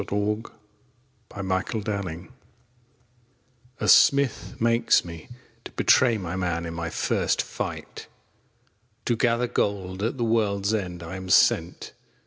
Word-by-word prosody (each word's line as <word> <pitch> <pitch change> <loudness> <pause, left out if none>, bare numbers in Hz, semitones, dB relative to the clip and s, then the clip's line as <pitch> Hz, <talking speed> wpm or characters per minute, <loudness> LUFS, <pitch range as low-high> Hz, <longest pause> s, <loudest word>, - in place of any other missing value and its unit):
THE 100 - -5
RUNES 105 +2 -1 0.8
ON 95 -2 -6
WELAND'S 95 +3 -2
SWORD 95 -5 -4 1.5
A - - -2
Smith 140 -3 +4
makes 115 -3 +3
me 85 -2 -10 0.4
To - - -8
betray 120 -3 +4
my 90 -3 -5
Man 85 -2 -2
In 85 - -5
my 85 0 -4
first - - 0
fight. - - -6 1.0
To 120 - +1
gather 120 +1 +1
Gold 95 -5 -2
At 115 +5 -2
the 120 - -1
world's 105 -3 +1
end 90 -5 -3
I 85 +3 -6
am 95 0 -8
sent. - - +2
100 Hz, 130 wpm, -25 LUFS, 90-115 Hz, 1.5 s, Smith